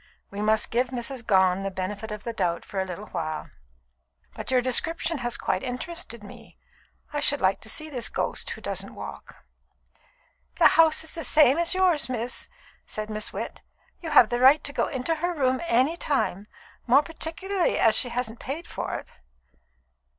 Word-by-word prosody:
We 200 +1 -5
must 215 0 +2
give 245 +2 +2
Mrs. 245 0 -5
Gone 190 -4 +3
the 195 - -2
benefit 195 +3 -5
of 210 -1 -6
the 235 - -4
doubt 175 -5 -1
for 195 - -4
a - - -2
little 185 +3 -7
while. 155 -1 -4 0.8
But - - -7
your 260 -1 +4
description 315 +5 +1
has 240 -1 0
quite - - -1
interested 255 -2 -5
me; 205 - -13 0.6
I 295 - 0
should 290 0 +2
like 190 +1 +1
to 220 - -5
see 310 - 0
this 255 -6 -1
ghost - - -2
who - - -6
doesn't - - -4
walk." - - -10 1.1
"The - - +7
house 320 -1 +4
is 320 - -7
the 330 - -6
same 300 0 +5
as 340 +2 +2
yours, 350 -9 +2
miss," 245 0 -3 0.4
said 215 0 -5
Miss 215 0 -2
Witt. - - -6 0.4
"You 330 - -5
have 240 -7 +7
the 240 - -1
right 270 +4 +6
to 285 - -6
go - - +1
into 260 +5 -1
her 350 +2 -1
room 260 -3 +1
at 340 - -6
any 260 +8 +3
time, 210 - -1 0.4
more 265 +5 +6
particularly 350 +4 -1
as 225 - +4
she 245 - +3
hasn't 235 -1 -2
paid 310 +6 -5
for - - -4
it." - - -6
250 Hz, 185 wpm, -26 LUFS, 215-310 Hz, 1.1 s, The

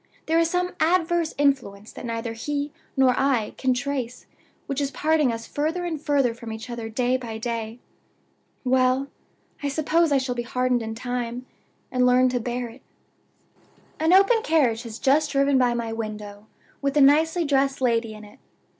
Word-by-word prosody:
There 325 +1 +2
is 330 -1 +2
some 360 +1 0
adverse 340 -1 +1
influence 250 -8 0
that - - -8
neither 230 0 -3
he 285 +5 -3 0.3
nor 260 -1 +5
I 260 -6 +1
can 260 - +2
trace 255 -2 -4 0.4
which 275 0 -2
is 280 - 0
parting 300 -1 +1
us 230 0 -5
further 320 +5 -2
and 320 -4 -3
further 280 -5 +2
from 230 -1 -9
each 220 +2 -7
other 230 -2 -5
day 250 +3 +1
by 230 -3 -6
day. 230 0 -4 0.9
Well! 260 +1 +2 0.5
I 285 - -1
suppose 315 +3 +1
I 280 - +4
shall 260 -1 -1
be 240 - -3
hardened 250 0 0
in 220 0 -5
time, 245 0 -4 0.5
and 250 -1 +1
learn 255 +1 +4
to 250 0 -1
bear 245 +1 -3
it. 235 +3 -14 1.2
"An 320 +2 +2
open 395 +5 +5
carriage 270 - +2
has 230 -2 -8
just 295 +4 +2
driven 275 -1 +3
by 245 -1 +2
my 230 -1 -3
window, 210 -2 -6 0.3
with 280 +1 0
a - - +6
nicely 320 +5 +4
dressed 275 -1 +1
lady 230 -3 0
in 215 - -11
it. 205 - -17
255 Hz, 175 wpm, -24 LUFS, 235-290 Hz, 1.2 s, a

